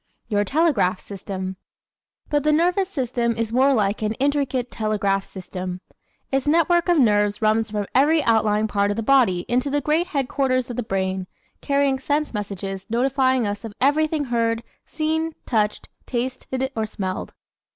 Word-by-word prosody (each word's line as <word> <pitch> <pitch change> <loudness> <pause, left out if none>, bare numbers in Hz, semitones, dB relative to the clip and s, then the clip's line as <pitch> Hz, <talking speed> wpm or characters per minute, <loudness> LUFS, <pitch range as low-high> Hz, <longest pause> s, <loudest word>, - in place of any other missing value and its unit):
Your 205 -2 +2
Telegraph 215 - +2
System 195 -1 -6 0.8
¶ - - -30
But 295 -1 +2
the 305 - +2
nervous 360 +5 +2
system 245 -7 -1
is 230 0 -2
more 265 +3 +4
like 210 -5 +1
an 215 0 0
intricate 270 -1 0
telegraph 200 -3 0
system. 185 -1 -6 0.5
Its 270 +1 0
network 340 +3 +3
of 350 - +4
nerves 205 -5 +3
runs 220 +1 +2
from 205 -1 -2
every 295 +4 +4
outlying 220 -2 +2
point 200 -1 +1
of - - -2
the 225 - -2
body 230 -8 +4
into 250 +4 +1
the 290 +1 +1
great 310 +4 +1
headquarters 260 -2 0
of - - -5
the - - 0
brain, 190 -3 -2 0.3
carrying 280 -1 +1
sense 290 +2 -1
messages 195 -2 -5
notifying 260 +1 +2
us 205 0 -3
of 220 -2 -8
everything 305 +2 +2
heard, 230 -2 0 0.2
seen, 320 +1 -1
touched, 215 -3 0 0.2
tasted 260 +1 -3
or 220 -1 -1
smelled. 190 -3 -4
240 Hz, 160 wpm, -23 LUFS, 205-280 Hz, 0.8 s, more